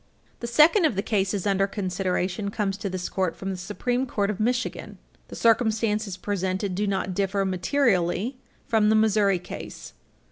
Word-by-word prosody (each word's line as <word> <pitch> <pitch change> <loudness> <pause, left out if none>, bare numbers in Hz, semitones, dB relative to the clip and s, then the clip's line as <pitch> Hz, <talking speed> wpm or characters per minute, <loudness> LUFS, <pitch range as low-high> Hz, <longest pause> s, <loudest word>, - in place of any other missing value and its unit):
The 235 - -4
second 310 - +5
of 295 - +2
the 195 - -1
cases 200 -2 0
under 195 -1 +2
consideration 185 0 -2
comes 200 -1 -1
to 200 -1 -4
this 185 -1 -3
Court 185 -4 -1
from 195 0 -4
the - - -3
Supreme 245 +8 -2
Court 205 -4 0
of 205 - -7
Michigan. 245 +3 -2 0.3
The - - -9
circumstances 220 -3 +1
presented 190 0 -2
do 205 +3 -1
not 190 -1 -1
differ 195 +1 0
materially 195 +2 +1 0.3
from 215 -2 +3
the 220 - +4
Missouri 210 -3 +3
case. 175 - -9
200 Hz, 165 wpm, -25 LUFS, 190-220 Hz, 0.3 s, second